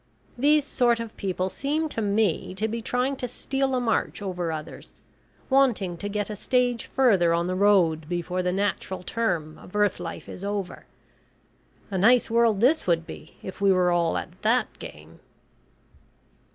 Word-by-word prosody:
These 290 +3 +3
sort 240 -4 +2
of 230 -1 -6
people 185 -1 -2
seem 300 - -1
to 225 - -3
me 200 -3 0
to 215 +3 -1
be 230 +1 -4
trying 250 +4 -1
to 250 - -3
steal 270 +2 -2
a - - +1
march 235 -2 -1
over 180 -4 -3
others, 155 -1 -8 0.5
wanting 245 -10 +2
to 205 +4 -4
get 205 +1 -2
a - - -4
stage 245 +1 0
further 195 -11 +3
on 170 0 0
the 180 - -2
road 180 -6 +3
before 180 +1 -2
the 180 0 0
natural 190 -1 -2
term 175 -8 -2
of 180 - -14
earth 210 -3 +2
life 170 -2 -7
is 185 - -9
over. 200 -2 -4 1.0
A 190 - -1
nice 235 +4 +4
world 230 -3 +3
this 275 +2 +3
would 165 -2 +2
be 155 - -11
if 190 +1 -8
we 200 -1 +5
were 180 -1 +3
all 170 -1 +1
at 175 +3 -7
that 230 +1 +2
game." 75 +2 -11
205 Hz, 170 wpm, -25 LUFS, 180-240 Hz, 1.0 s, we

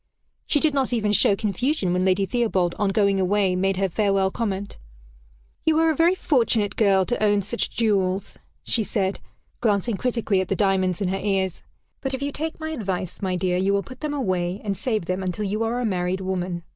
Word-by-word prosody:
She 295 - +2
did 305 0 +2
not 270 -2 0
even 215 -4 +1
show 205 -1 +4
confusion 210 - 0
when 180 0 +1
Lady 190 +1 +2
Theobald, 195 -6 0
on 205 - +2
going 200 -1 +2
away, 190 0 +2
made 190 +1 +1
her 195 0 +1
farewell 195 0 +1
comment: 200 -3 -3 0.8
"You 315 -1 +3
are 325 0 +4
a - - -1
very 335 +5 +4
fortunate 230 - +1
girl 195 -3 +3
to 240 0 -1
own 205 -1 +3
such 225 +5 -2
jewels," 195 -4 0 0.3
she 230 - +1
said, 195 -2 -1 0.4
glancing 210 -1 +1
critically 230 -5 0
at 185 - -3
the 195 - 0
diamonds 190 -2 +1
in 190 - 0
her 195 +1 -1
ears; 190 -3 -1 0.4
"but 270 -1 -2
if 265 - -7
you 285 - -1
take 315 +3 -4
my 315 0 -4
advice, 190 - -4
my 185 -2 -1
dear, 180 0 0
you 190 +2 +1
will 200 0 +1
put 255 0 -11
them 300 -1 -3
away, 185 -7 -1
and 200 -2 -1
save 215 -2 -2
them 185 +2 -2
until 190 +3 -2
you 210 +3 -2
are 230 +2 0
a 250 - -1
married 185 -2 -1
woman. 180 -2 -3
200 Hz, 210 wpm, -24 LUFS, 190-235 Hz, 0.8 s, show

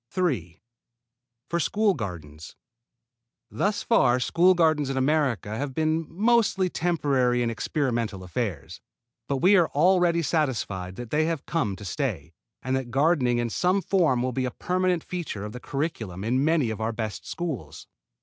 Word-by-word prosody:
3. 125 - -2 0.9
For 170 - -1
school 205 +5 +2
gardens. 80 - -7 1.0
Thus 205 +1 -1
far 130 - +3
school 180 +8 +4
gardens 155 -5 +2
in 135 - -2
America 130 -6 +1
have 135 +2 -4
been 160 0 0
mostly 195 -1 +2
temporary 140 -8 +1
and 115 - 0
experimental 115 - -2
affairs. 90 - -4 0.5
But 135 -2 -2
we 195 +3 +6
are 170 -3 +4
already 175 +1 +3
satisfied 110 - -1
that 120 0 -8
they 155 +1 +2
have 165 -3 -2
come 120 - -1
to 100 - -10
stay, 90 - -3 0.3
and 130 0 0
that 130 -2 -3
gardening 135 -2 +2
in 120 -1 -1
some 185 - +2
form 165 -10 +2
will 130 - -1
be 130 +1 -1
a - - -1
permanent 180 +4 -1
feature 165 - -5
of 105 - -6
the 125 - -8
curriculum 125 - -4
in 125 +5 +1
many 155 -7 +2
of 110 - -5
our 110 +1 0
best 110 -2 -5
schools. 135 - -5
135 Hz, 160 wpm, -26 LUFS, 115-170 Hz, 1.0 s, we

